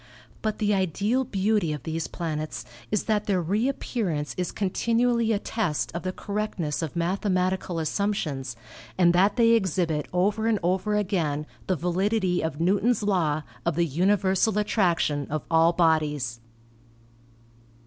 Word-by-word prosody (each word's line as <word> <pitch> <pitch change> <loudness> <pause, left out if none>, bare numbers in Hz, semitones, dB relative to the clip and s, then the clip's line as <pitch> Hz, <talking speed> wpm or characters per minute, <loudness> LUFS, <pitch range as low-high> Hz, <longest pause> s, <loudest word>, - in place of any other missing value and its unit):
But 215 -1 -1
the 210 -1 +1
ideal 200 - +1
beauty 205 -5 0
of 150 -4 -6
these 160 0 -3
planets 155 -8 -4 0.2
is 210 - 0
that 210 -1 0
their 195 -3 +2
reappear 220 +3 -1
ance 150 -2 -2
is 180 -1 -2
continually 230 +3 +1
a 215 - +2
test 200 -7 -2
of 170 - -3
the 185 - -2
correctness 200 -7 -3
of 160 -1 -4
mathemati 185 +1 0
cal 175 -3 -5
assumptions 155 - -2 0.4
and 175 -2 +5
that 195 +3 +3
they 230 -2 +4
exhibit 175 -8 +1
over 205 +5 +1
and 225 -2 +3
over 190 +4 +1
again 170 -8 0 0.2
the 185 - +2
validity 180 +2 0
of 160 -2 -3
Newton's 205 +7 +2
law 165 -7 +1 0.2
of 170 -2 0
the 170 +1 +2
universal 190 +5 +2
attraction 170 - +1
of 155 -3 -2
all 165 +1 +5
bodies. 150 -8 +1
185 Hz, 145 wpm, -26 LUFS, 160-210 Hz, 0.4 s, and